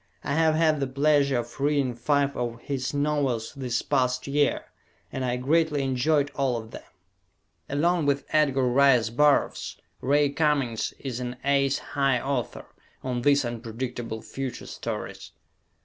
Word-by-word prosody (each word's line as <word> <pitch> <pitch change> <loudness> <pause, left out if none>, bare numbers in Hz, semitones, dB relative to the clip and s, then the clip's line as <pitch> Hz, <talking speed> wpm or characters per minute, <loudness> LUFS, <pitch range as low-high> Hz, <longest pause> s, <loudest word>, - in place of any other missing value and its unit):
I 140 - -2
have 160 0 +3
had 155 -2 +3
the 135 - -1
pleasure 140 0 +2
of 120 +3 -5
reading 140 -3 +1
five 140 +3 0
of 120 -1 -3
his 130 -2 -3
novels 145 -6 -1
this 125 -4 -2
past 125 -2 0
year 145 +1 +1 0.5
and 130 - -3
I 125 -1 0
greatly 150 +2 +1
enjoyed 140 +3 +1
all 135 -3 0
of 110 0 -8
them. - - -8 0.9
Along 165 +2 +1
with 140 0 +1
Edgar 140 -4 +2
Rice 125 -3 +4
Burroughs, 145 +4 +2 0.2
Ray 145 +2 +3
Cummings 140 -7 0
is 130 -3 -5
an 125 0 -4
"ace 140 -1 +2 0.2
high" 135 -3 +2
author 135 -2 -3 0.4
on 125 -2 -2
these 140 +1 +3
"unpredictable 115 -1 -5
future" 135 -2 -6
stories. - - -6
135 Hz, 145 wpm, -26 LUFS, 125-145 Hz, 0.9 s, Rice